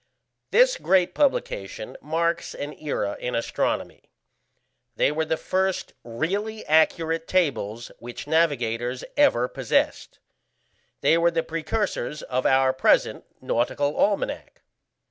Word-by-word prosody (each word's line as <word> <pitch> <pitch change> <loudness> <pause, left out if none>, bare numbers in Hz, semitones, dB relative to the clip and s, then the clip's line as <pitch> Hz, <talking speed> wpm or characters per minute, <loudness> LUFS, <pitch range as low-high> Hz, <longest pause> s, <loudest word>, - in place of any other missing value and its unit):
This - - +4
great 185 - +2
publication 110 - -1
marks 170 +2 -1
an 145 +1 -5
era 120 -9 -2
in 125 - -3
astronomy. 115 - -2 0.9
They - - +2
were 160 +1 -1
the 160 0 -1
first 190 +2 -1
really 195 - -3
accurate 160 +1 +2
tables 120 - -1
which 120 +1 -8
navigators 125 -6 0
ever 125 - +4
possessed; - - -1 0.8
they 165 - +4
were 170 0 +4
the 165 -1 -1
precursors 165 - -3
of 130 0 -1
our 130 0 +4
present 130 - +2 0.2
Nautical 145 +5 0
Almanack. 200 +4 -1
160 Hz, 110 wpm, -25 LUFS, 125-175 Hz, 0.9 s, This